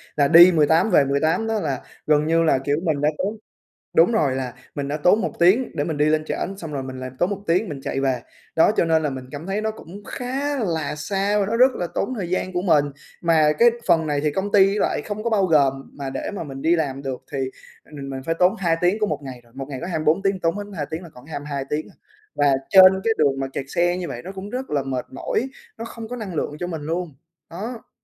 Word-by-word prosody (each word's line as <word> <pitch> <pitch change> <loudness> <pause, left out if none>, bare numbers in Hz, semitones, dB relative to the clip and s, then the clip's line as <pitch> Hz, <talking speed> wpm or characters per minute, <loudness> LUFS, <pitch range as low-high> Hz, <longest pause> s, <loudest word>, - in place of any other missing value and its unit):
là 145 -1 +3
đi 170 +3 +9
18 160 +5 +3
về 140 - +5
18 155 +10 +1
đó 220 -1 0
là, 140 -7 -2 0.3
gần 150 0 +3
như 165 +1 +3
là, 155 -4 +3
kiểu, 145 +2 0
mình 155 -5 0
đã 150 - +3
tốn 210 +3 -2 0.6
đúng 165 +8 +6
rồi, 145 - +1
là 130 -2 -3 0.2
mình 140 -1 -3
đã 145 - -2
tốn 180 +8 +3
1 - - -2
tiếng 195 +9 +4
để 145 - 0
mình 155 -1 -3
đi 150 - +3
lên 155 0 +1
trển, 195 +4 -3
xong 160 -5 -7
rồi 135 - -3
mình 130 0 -7
lại 130 0 -5
tốn 175 - +2
1 200 -1 -4
tiếng 180 +5 +1
mình 140 -3 -6
chạy 135 - -3
về. 130 -3 0 0.3
Đó, 165 - +5
cho - - +3
nên 160 -1 +2
là 150 - +1
mình 130 -1 -6
cảm 150 +3 -7
thấy 195 +2 -2
nó 220 0 -1
cũng 200 -1 -12
khá 275 +3 -3
là 160 -8 -2
xa 200 +6 0
và 200 - +1
nó 230 +3 -1
rất 255 +1 +6
là 175 - -2
tốn 260 - -1
thời 175 -4 -4
gian 185 0 -2
của 180 - 0
mình. 155 -6 +3 0.4
Mà 160 -3 +4
cái 240 - +7 0.2
phần 160 -1 +3
này 145 -1 0
thì 150 -1 +1
công 195 +5 -2
ty 195 0 +5
lại - - 0
không 210 +1 -5
có 235 - 0
bao 200 -4 +2
gồm, 145 -5 +4 0.2
mà 140 -2 -5
để 135 - -4
mà 195 -4 -5
mình 135 -2 -8
đi 165 +4 +3
làm 140 -4 -2
được 135 -2 -5
thì 140 - -3 0.6
mình 140 -1 -7
mình 135 -1 -5
phải 165 - 0
tốn 180 +1 +4
2 170 -3 +2
tiếng 185 +5 +2
của 210 - +1
một 150 - -2
ngày 130 -2 -8
rồi. 115 - -25
Một 135 0 -5
ngày 135 -2 -5
có 170 - -4
24 160 +1 +1
tiếng 195 -1 +1
tốn 165 0 0
hết 205 - -4
2 145 - -2
tiếng 160 +3 -4
là 170 - -11
còn 125 -3 -16
có 160 - -14
22 145 -2 -4
tiếng 150 +1 -2
à! - - -20 0.4
Và 145 -1 +3 0.2
trên 190 0 +7
cái 225 - +2
đường 140 -3 +2
mà 135 - -2
kẹt 135 - -3
xe 175 +4 +1
như 180 -1 -4
vậy 120 - -6
nó 190 - -7
cũng 195 +1 -8
rất 255 +3 -5
là 145 -2 0
mệt 130 -2 -3
mỏi, 250 - -2 0.3
nó 230 - -6
không 230 -1 -8
có 250 - -5
năng 200 -7 -6
lượng 150 - -2
cho 175 - -3
mình 165 -3 -5
luôn. 165 0 -3 0.3
Đó! 220 +7 -7
165 Hz, 270 wpm, -22 LUFS, 145-195 Hz, 0.6 s, đi